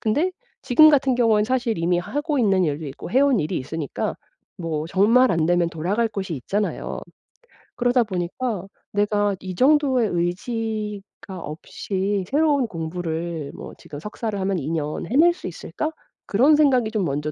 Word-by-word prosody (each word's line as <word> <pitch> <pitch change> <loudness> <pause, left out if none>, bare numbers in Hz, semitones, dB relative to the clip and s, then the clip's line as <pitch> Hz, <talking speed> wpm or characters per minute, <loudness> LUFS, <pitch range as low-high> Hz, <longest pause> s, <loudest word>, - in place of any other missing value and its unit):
근데 295 +12 +1 0.3
지금 275 +4 +7
같은 270 -3 +3
경우엔 225 -4 +4
사실 240 -1 0
이미 175 +1 +1
하고 290 - -2
있는 195 -6 +3
일도 150 0 -2
있고 140 +4 -8
해온 265 -1 +4
일이 155 +4 -2
있으니까 145 +2 -3 0.4
뭐 160 -2 -3
정말 225 +8 +4
안 165 -1 +1
되면 175 -1 +2
돌아갈 190 +9 0
곳이 195 -5 -4
있잖아요. 200 +11 -3 0.8
그러다 245 0 +3
보니까 190 +2 -3 0.3
내가 205 0 +1
이 185 -2 -6
정도의 265 - +3
의지가 205 +2 -3
없이 190 +5 -3
새로운 290 -2 +3
공부를 165 -3 -4
뭐 - - -9
'지금 145 - -10
석사를 210 - -4
하면 190 0 0
2년 150 +1 -3
해낼 325 +7 +5
수 350 - -8
있을까?' 310 - -4 0.4
그런 265 +9 +5
생각이 265 -7 +3
좀 215 -4 0
먼저 150 +1 -2
205 Hz, 310 characters per minute, -23 LUFS, 170-250 Hz, 0.8 s, 지금